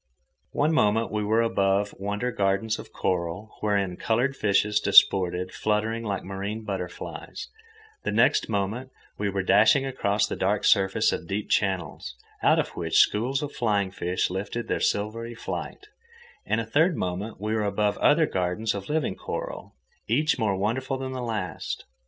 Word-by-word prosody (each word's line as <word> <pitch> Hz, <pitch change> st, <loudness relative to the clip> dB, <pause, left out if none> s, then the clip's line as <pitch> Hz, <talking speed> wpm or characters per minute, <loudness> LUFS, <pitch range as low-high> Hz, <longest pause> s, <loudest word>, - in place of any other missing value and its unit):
One 155 Hz, +3 st, +2 dB
moment 115 Hz, -5 st, +2 dB
we 105 Hz, 0 st, -1 dB
were 110 Hz, +3 st, +2 dB
above 100 Hz, -2 st, +1 dB
wonder 100 Hz, +5 st, -2 dB
gardens 100 Hz, +2 st, 0 dB
of -, -, -10 dB
coral, 90 Hz, +3 st, -2 dB
wherein 100 Hz, -4 st, 0 dB
coloured 125 Hz, +5 st, 0 dB
fishes 105 Hz, -2 st, +2 dB
disported, 90 Hz, -3 st, +4 dB
fluttering 110 Hz, +2 st, -1 dB
like 100 Hz, -3 st, -3 dB
marine 100 Hz, +3 st, -5 dB
butterflies; 95 Hz, -4 st, -6 dB, 0.5 s
the -, -, -2 dB
next -, -, +3 dB
moment 110 Hz, +5 st, -2 dB, 0.3 s
we 105 Hz, 0 st, 0 dB
were 95 Hz, -1 st, -2 dB
dashing 105 Hz, +8 st, +5 dB
across 105 Hz, -6 st, 0 dB
the -, -, -4 dB
dark 100 Hz, +2 st, 0 dB
surface 95 Hz, -2 st, +3 dB
of 85 Hz, -, -4 dB
deep 100 Hz, +3 st, -3 dB
channels, 95 Hz, -, -1 dB, 0.3 s
out -, -, +4 dB
of -, -, 0 dB
which -, -, -2 dB
schools 130 Hz, +7 st, +3 dB
of 145 Hz, -, -4 dB
flying 100 Hz, -5 st, 0 dB
fish 90 Hz, -1 st, -1 dB
lifted 105 Hz, +5 st, -4 dB
their -, -, -1 dB
silvery 115 Hz, +3 st, -1 dB
flight; 410 Hz, -, -6 dB, 0.6 s
and 110 Hz, -, +1 dB
a 115 Hz, -, -2 dB
third 155 Hz, +9 st, +2 dB
moment 95 Hz, +5 st, -3 dB
we 105 Hz, +2 st, -2 dB
were 110 Hz, -, +1 dB
above 105 Hz, 0 st, 0 dB
other 155 Hz, +2 st, +4 dB
gardens 95 Hz, +1 st, -1 dB
of 100 Hz, -1 st, -6 dB
living 150 Hz, -9 st, 0 dB
coral, -, -, -6 dB, 0.3 s
each 145 Hz, +5 st, +2 dB
more 105 Hz, -4 st, +1 dB
wonderful 130 Hz, +7 st, -1 dB
than 130 Hz, 0 st, -5 dB
the 130 Hz, -1 st, -4 dB
last. 110 Hz, -6 st, -4 dB
105 Hz, 160 wpm, -26 LUFS, 95-115 Hz, 0.6 s, dashing